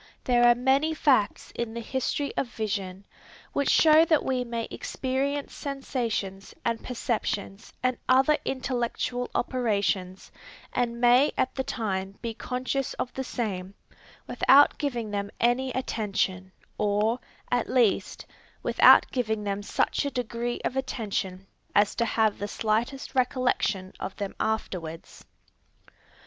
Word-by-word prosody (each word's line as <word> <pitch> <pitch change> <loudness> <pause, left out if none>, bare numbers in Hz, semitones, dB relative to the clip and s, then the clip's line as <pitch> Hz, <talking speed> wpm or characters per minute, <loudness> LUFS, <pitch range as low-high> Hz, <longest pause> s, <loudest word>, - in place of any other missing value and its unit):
There 240 -1 +4
are 240 - +7
many 270 +6 +2
facts 255 -10 +2
in 235 -1 -4
the - - -3
history 265 +4 -2
of 270 - 0
vision, 200 -4 -4 0.5
which 280 - +1
show 315 0 +7
that 315 -2 +2
we 255 -1 0
may 235 -1 -4
experience 275 +2 -2
sensations 235 -9 -4
and 230 -1 -1
perceptions 215 -4 -3
and 255 -1 +1
other 270 +4 +5
intellectual 245 -1 -2
operations, 200 -7 -1 0.4
and 235 -1 -1
may 245 +4 +5
at - - +1
the 265 - -2
time 195 -5 -3
be 230 -1 -4
conscious 255 +3 -3
of 250 - -4
the 265 - -3
same, 200 -7 -4 0.5
without 285 +2 +5
giving 240 -7 -2
them 200 0 -2
any 245 +2 +2
attention, 195 -6 -2 0.3
or, 210 +3 +1 0.3
at 245 -1 +1
least, 240 -6 +1 0.4
without - - +7
giving 220 -4 -1
them 200 0 -2
such 205 - 0
a 285 - -1
degree 240 -2 -3
of - - -1
attention 200 -7 -3 0.3
as 205 0 +4
to 235 - 0
have 220 -2 +1
the 205 - -3
slightest 225 +6 -1
recollection 250 -7 0
of 190 - -5
them 200 -2 -4
afterwards. 175 -7 -4
235 Hz, 130 wpm, -27 LUFS, 205-260 Hz, 0.5 s, are